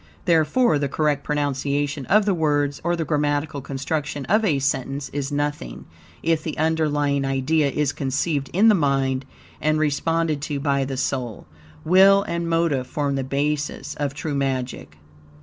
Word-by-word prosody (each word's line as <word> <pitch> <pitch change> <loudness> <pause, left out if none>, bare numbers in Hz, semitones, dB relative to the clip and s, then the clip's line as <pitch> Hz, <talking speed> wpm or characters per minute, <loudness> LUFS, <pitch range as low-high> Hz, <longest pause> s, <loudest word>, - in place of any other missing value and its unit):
Therefore, 165 - +3
the 140 -1 -1
correct 150 0 0
pronunciation 145 -1 -1
of 210 +2 +4
the 200 - +2
words 145 -4 0
or 175 +1 +1
the 165 -1 -2
grammatical 145 0 -1
construction 140 +1 -3
of 215 +5 +2
a 165 -9 +2
sentence 135 0 -2
is 140 0 -4
nothing, 145 - -3 0.4
if 165 -1 +1
the 155 -1 -5
underlying 150 -3 +1
idea 135 +3 +1
is 145 0 0
conceived 140 +1 -1
in 205 +5 +4
the 220 - +7
mind 135 -5 +1 0.4
and 155 0 +2
responded 155 0 0
to 145 -1 -3
by 140 -1 +1
the 135 0 -4
soul. 125 -3 -3 0.4
Will 195 +3 +6
and 170 -1 -3
motive 165 -6 +1
form 145 -1 -1
the 135 -1 -1
basis 145 +1 -2
of 145 -1 -3
true 150 0 -4
magic. 130 - -3
145 Hz, 155 wpm, -23 LUFS, 140-160 Hz, 0.4 s, the